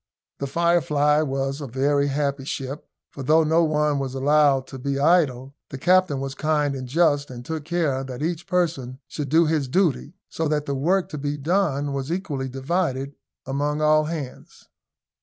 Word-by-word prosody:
The 140 - -2
Firefly 150 -2 +2
was 135 0 -2
a 140 - -5
very 140 +3 +1
happy 140 -1 -1
ship; 135 +1 -5 0.2
for 140 - -8
though 155 +5 +4
no 160 +2 +3
one 150 -2 +1
was 135 -1 -4
allowed 140 -1 +3
to 135 - -8
be 140 +1 -2
idle, 140 -4 +2 0.2
the 135 - -6
captain 180 -1 +3
was 135 0 -4
kind 150 0 0
and 130 -2 -5
just, 145 0 +2
and 120 -1 -9
took 160 0 -4
care 155 -6 0
that 130 +2 -6
each 170 +1 -3
person 155 -8 -1
should 145 -3 -5
do 165 +3 +4
his 155 -3 0
duty; 165 +1 0
so 160 - -2
that 150 -1 0
the 140 - -2
work 175 +8 +1
to 150 - -6
be 145 +1 -2
done 145 -3 0
was 135 +2 -3
equally 150 -8 -3
divided 135 0 -2 0.3
among 145 +3 -1
all 155 0 +4
hands. 150 -5 -7
145 Hz, 175 wpm, -23 LUFS, 135-160 Hz, 0.3 s, though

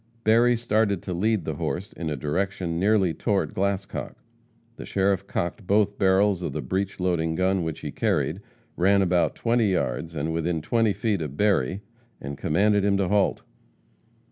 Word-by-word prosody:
Berry 120 +2 +4
started 110 -5 0
to 90 - -4
lead 105 +1 0
the - - -3
horse 95 +3 -3
in 85 -2 -4
a 75 - -2
direction 85 +4 -2
nearly 100 -3 +3
toward 100 0 -1
Glascock. 100 0 -2 0.6
The - - -7
sheriff 95 -1 0
cocked 90 +3 -3
both 105 0 +2
barrels 95 0 +3
of 75 - -3
the 75 - -3
breech 95 +1 -2
loading 85 -3 0
gun 95 +1 +1
which 80 -2 -4
he - - -5
carried, - - -1 0.3
ran 100 +2 +3
about 90 -1 +1
twenty 115 -1 +1
yards 80 +1 -2
and 80 +2 -2
within 85 0 -1
twenty 115 +3 +2
feet 100 -1 -1
of 75 -2 -5
Berry, 100 -4 +1 0.4
and 70 +1 -6
commanded 100 +8 +2
him 100 0 +2
to 95 -2 0
halt. 100 -1 +1
95 Hz, 170 wpm, -25 LUFS, 85-105 Hz, 0.6 s, Berry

